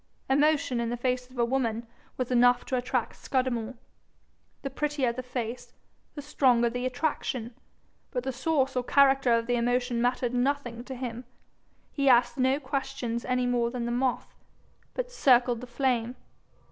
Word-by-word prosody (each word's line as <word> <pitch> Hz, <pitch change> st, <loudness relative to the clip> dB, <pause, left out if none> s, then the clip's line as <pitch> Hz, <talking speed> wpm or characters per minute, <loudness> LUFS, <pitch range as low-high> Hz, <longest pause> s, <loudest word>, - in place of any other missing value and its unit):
Emotion 285 Hz, -2 st, +2 dB
in 235 Hz, -1 st, -1 dB
the 240 Hz, -, -2 dB
face 250 Hz, +1 st, -1 dB
of 255 Hz, -, -16 dB
a 235 Hz, -, +3 dB
woman 235 Hz, -2 st, -1 dB, 0.3 s
was 255 Hz, -1 st, -2 dB
enough 245 Hz, 0 st, +4 dB
to 260 Hz, -, -2 dB
attract 250 Hz, -1 st, -1 dB
Scudamore; 255 Hz, -2 st, -1 dB, 0.9 s
the 275 Hz, -, -4 dB
prettier 285 Hz, -3 st, -1 dB
the 255 Hz, -, -4 dB
face, 245 Hz, -1 st, -5 dB, 0.4 s
the 290 Hz, -, -6 dB
stronger 245 Hz, -5 st, +3 dB
the 245 Hz, +1 st, -2 dB
attraction, 255 Hz, -3 st, -2 dB, 0.6 s
but 250 Hz, -2 st, -3 dB
the 265 Hz, -, -2 dB
source 265 Hz, 0 st, 0 dB
or 250 Hz, -, 0 dB
character 270 Hz, -1 st, +4 dB
of 230 Hz, 0 st, +3 dB
the 245 Hz, -, 0 dB
emotion 245 Hz, 0 st, 0 dB
mattered 245 Hz, 0 st, 0 dB
nothing 245 Hz, -2 st, -1 dB
to 265 Hz, -, -6 dB
him: 245 Hz, -1 st, -5 dB, 0.7 s
he 275 Hz, -2 st, +2 dB
asked 240 Hz, +1 st, +4 dB
no 260 Hz, +2 st, +3 dB
questions 265 Hz, -4 st, -3 dB
any 250 Hz, 0 st, 0 dB
more 240 Hz, -1 st, +1 dB
than 240 Hz, -1 st, -4 dB
the 235 Hz, -, -2 dB
moth, 250 Hz, +1 st, -1 dB, 0.6 s
but -, -, -3 dB
circled 245 Hz, -, +3 dB
the 250 Hz, -, -8 dB
flame. 245 Hz, -1 st, 0 dB
250 Hz, 160 wpm, -28 LUFS, 240-265 Hz, 0.9 s, enough